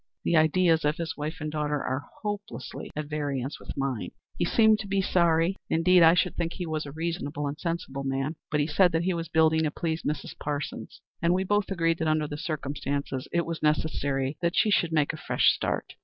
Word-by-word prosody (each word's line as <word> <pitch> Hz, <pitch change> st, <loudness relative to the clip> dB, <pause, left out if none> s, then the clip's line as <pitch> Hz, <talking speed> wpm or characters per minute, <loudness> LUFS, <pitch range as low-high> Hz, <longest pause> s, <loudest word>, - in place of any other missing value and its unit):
The 170 Hz, -, +2 dB
ideas 160 Hz, +1 st, +4 dB
of 150 Hz, +1 st, +1 dB
his 165 Hz, -1 st, -3 dB
wife 150 Hz, +1 st, -4 dB
and 155 Hz, -1 st, -4 dB
daughter 150 Hz, -1 st, -1 dB
are 130 Hz, +1 st, -3 dB, 0.2 s
hopelessly 205 Hz, -, -5 dB
at 150 Hz, 0 st, -3 dB
variance 145 Hz, -2 st, -3 dB
with -, -, -9 dB
mine. 135 Hz, -4 st, -2 dB, 0.3 s
He 175 Hz, -, 0 dB
seemed 220 Hz, +3 st, +4 dB
to 200 Hz, -, -5 dB
be 195 Hz, 0 st, +1 dB
sorry 170 Hz, -1 st, +2 dB
indeed, 180 Hz, +2 st, +4 dB
I 165 Hz, +1 st, +7 dB
should -, -, +1 dB
think 170 Hz, -1 st, -2 dB
he 180 Hz, -, -4 dB
was 155 Hz, -2 st, -3 dB
a -, -, -7 dB
reasonable 155 Hz, -2 st, -3 dB
and 140 Hz, +1 st, -2 dB
sensible 165 Hz, -6 st, -3 dB
man 135 Hz, +3 st, -2 dB
but 150 Hz, -, 0 dB
he 145 Hz, -, +2 dB
said 175 Hz, +3 st, +3 dB
that 165 Hz, +1 st, +1 dB
he 185 Hz, +1 st, +1 dB
was 165 Hz, -1 st, -3 dB
building 160 Hz, 0 st, +4 dB
to 155 Hz, -, +1 dB
please 160 Hz, +2 st, -2 dB
Mrs. 145 Hz, -1 st, -3 dB
Parsons, 145 Hz, 0 st, -5 dB, 0.2 s
and 170 Hz, +1 st, +3 dB
we 190 Hz, -, +1 dB
both 205 Hz, +1 st, +1 dB
agreed 165 Hz, -3 st, +1 dB
that 160 Hz, -, 0 dB
under 155 Hz, -1 st, +2 dB
the 145 Hz, -, -5 dB
circumstances 140 Hz, -3 st, -3 dB
it 170 Hz, 0 st, +1 dB
was 165 Hz, -1 st, -4 dB
necessary 145 Hz, -3 st, 0 dB
that 170 Hz, 0 st, 0 dB
she 215 Hz, -, +4 dB
should 170 Hz, -4 st, +2 dB
make 155 Hz, -1 st, +2 dB
a -, -, -6 dB
fresh -, -, +3 dB
start. -, -, -3 dB
160 Hz, 215 wpm, -27 LUFS, 145-170 Hz, 0.3 s, I